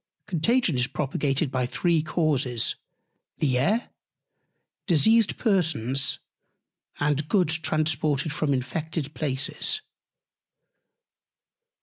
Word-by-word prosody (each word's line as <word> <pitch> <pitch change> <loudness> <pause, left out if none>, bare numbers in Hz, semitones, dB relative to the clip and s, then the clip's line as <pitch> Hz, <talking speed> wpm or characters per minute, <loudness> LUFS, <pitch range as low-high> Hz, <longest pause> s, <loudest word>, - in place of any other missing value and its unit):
Contagion 215 +3 +1
is 125 0 +1
propagated 140 +1 -1
by 125 -2 -1
three 170 +4 +1
Causes, 145 -7 0 0.6
the 130 -4 +1
Air; 210 - +1 1.0
Diseased 220 +6 +3
Persons; 155 - +1 0.8
and 145 +1 0
Goods 170 -6 +2
transported 155 -1 0
from 155 -1 -1
infected 150 +3 -3
Places. 145 - -1
155 Hz, 80 wpm, -25 LUFS, 135-170 Hz, 1.0 s, Diseased